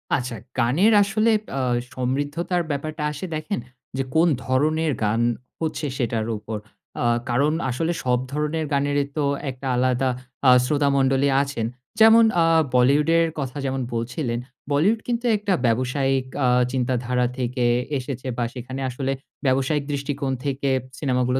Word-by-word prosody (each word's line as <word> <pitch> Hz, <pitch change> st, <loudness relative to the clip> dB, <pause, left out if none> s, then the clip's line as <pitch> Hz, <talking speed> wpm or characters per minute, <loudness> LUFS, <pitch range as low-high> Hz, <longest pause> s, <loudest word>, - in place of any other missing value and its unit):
আচ্ছা, 125 Hz, -2 st, -3 dB, 0.2 s
গানের 145 Hz, -, +4 dB
আসলে 215 Hz, +3 st, +2 dB, 0.2 s
অ্যা 135 Hz, -, -1 dB, 0.3 s
সমৃদ্ধতার 145 Hz, +8 st, -1 dB
ব্যাপারটা 150 Hz, +2 st, -3 dB
আসে 150 Hz, +5 st, -6 dB
দেখেন, 155 Hz, +6 st, -3 dB, 0.4 s
যে 135 Hz, -, +1 dB
কোন 165 Hz, +2 st, +5 dB, 0.2 s
ধরনের 155 Hz, +4 st, +1 dB
গান 110 Hz, +2 st, +1 dB, 0.4 s
হচ্ছে 160 Hz, -1 st, -2 dB
সেটার 115 Hz, -3 st, -1 dB
উপর 105 Hz, +1 st, -5 dB, 0.4 s
অ্যা 120 Hz, -, +1 dB, 0.2 s
কারণ 140 Hz, +6 st, +2 dB, 0.2 s
আসলে 160 Hz, +7 st, -1 dB
সব 125 Hz, -1 st, +2 dB
ধরনের 150 Hz, +2 st, -1 dB
গানেরই 140 Hz, 0 st, +1 dB
তো 150 Hz, -, +1 dB, 0.2 s
একটা 130 Hz, +1 st, -6 dB
আলাদা 130 Hz, +1 st, +2 dB, 0.4 s
আ -, -, +9 dB, 0.2 s
শ্রোতামণ্ডলী 140 Hz, -1 st, +2 dB
আছেন 140 Hz, -5 st, -3 dB, 0.3 s
যেমন 225 Hz, +1 st, +8 dB, 0.2 s
আ -, -, +4 dB, 0.3 s
বলিউডের 150 Hz, +6 st, +4 dB
কথা 135 Hz, 0 st, -4 dB
যেমন 135 Hz, 0 st, -1 dB
বলছিলেন, 120 Hz, +1 st, -2 dB, 0.3 s
বলিউড 185 Hz, +11 st, +3 dB
কিন্তু 240 Hz, 0 st, -1 dB
একটা 205 Hz, -1 st, 0 dB
ব্যবসায়িক 130 Hz, +3 st, +1 dB, 0.2 s
আ -, -, +4 dB, 0.2 s
চিন্তাধারা 125 Hz, -1 st, 0 dB
থেকে 125 Hz, 0 st, -1 dB, 0.3 s
এসেছে 130 Hz, 0 st, -5 dB
বা 120 Hz, -, 0 dB
সেখানে 130 Hz, +2 st, -6 dB
আসলে 135 Hz, +2 st, -2 dB, 0.3 s
ব্যবসায়িক 135 Hz, +3 st, +1 dB
দৃষ্টিকোণ 140 Hz, -1 st, -2 dB
থেকে 140 Hz, 0 st, -1 dB, 0.3 s
সিনেমা 130 Hz, -4 st, +1 dB
গুলো 125 Hz, +1 st, +1 dB
135 Hz, 135 wpm, -23 LUFS, 125-150 Hz, 0.4 s, আ